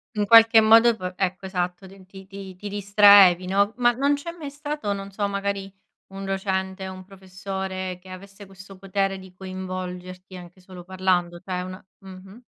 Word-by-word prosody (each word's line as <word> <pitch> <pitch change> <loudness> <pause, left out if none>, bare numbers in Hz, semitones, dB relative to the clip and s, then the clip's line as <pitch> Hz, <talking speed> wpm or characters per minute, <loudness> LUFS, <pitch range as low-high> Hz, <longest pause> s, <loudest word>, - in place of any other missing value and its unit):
In 210 -1 0
qualche 225 +1 +7
modo 225 +2 +6
p 185 -2 -6
ecco, 185 0 -3
esatto, 180 0 -4
ti 190 0 -16
ti 190 0 -14
ti 195 -1 -10
ti 205 +2 -8
distraevi, 200 -3 +5
no. 200 +3 +1
Ma 240 -1 +3
non 280 +4 +1
c'è 310 +4 -7
mai 310 -5 -8
stato, 290 -5 -5
non 195 0 -5
so, 205 +1 -3
magari 200 -1 -4 0.3
un 195 0 -9
docente, 190 0 -3
un 185 0 -10
professore 190 -1 -6
che 190 - -16
avesse 195 +2 -12
questo 195 0 -14
potere 195 0 -2
di 190 -1 -14
coinvolgerti 185 0 -8
anche 180 0 -12
solo 180 -1 -13
parlando? 180 -1 -1
Cioè 180 0 -5
una 185 +1 -9
mh-mh. 190 +3 -13
190 Hz, 170 wpm, -23 LUFS, 185-200 Hz, 0.3 s, qualche